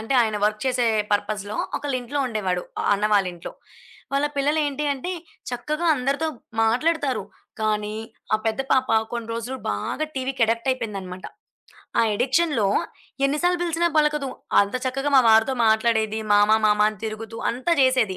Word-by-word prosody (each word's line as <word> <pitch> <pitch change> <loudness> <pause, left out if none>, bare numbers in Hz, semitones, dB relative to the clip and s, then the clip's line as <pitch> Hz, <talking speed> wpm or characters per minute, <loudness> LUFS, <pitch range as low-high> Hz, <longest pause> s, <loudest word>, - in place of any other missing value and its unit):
అంటే 225 +5 -2
ఆయన 215 -2 -1
వర్క్ 215 0 0
చేసే 250 -2 +1 0.3
పర్పస్‌లో, 205 0 -1 0.2
ఒకళీంట్లో 275 -1 -3
ఉండేవాడు. 190 -6 -1 0.2
ఆ - - -2
అన్న 210 +1 0
వాళీంట్లో. 180 -4 -1 0.6
వాళ్ళ 280 +1 +2
పిల్లలు 295 +3 +2
ఏంటి 290 +1 -3
అంటే, 315 +7 -4 0.4
చక్కగా 300 +7 -2
అందరితో 280 +4 -1 0.3
మాట్లాడుతారు. 275 +4 +1 0.4
కానీ, 210 -1 -1 0.4
ఆ - - +5
పెద్ద 220 +4 0
పాప 260 -1 +2 0.2
కొన్ని 235 -1 -4
రోజులు 240 +3 -4
బాగా 105 - -2
టీవీ‌కి 260 -1 -1
అడిక్ట్ 230 +3 -1
అయిపోయిందన్నమాట. 195 -7 -6 0.7
ఆ - - +6
అడిక్షన్‌లో 270 -5 +2 0.6
ఎన్ని 285 +2 -1
సార్లు 355 0 +2
బిలిసినా 340 0 +1
పలకదు. 300 -3 +1 0.3
అంత 200 +4 0
చక్కగా 270 +3 -1
మా 260 - +7
వారితో 225 +4 +4
మాట్లాడేది. 220 0 +2
మామ, 205 +1 +5 0.2
మామ 210 0 +3
అని 210 - -13
తిరుగుతూ 225 +1 -7
అంత 250 +7 -6
జేసేది. 255 -8 +3
240 Hz, 145 wpm, -23 LUFS, 215-275 Hz, 0.7 s, మా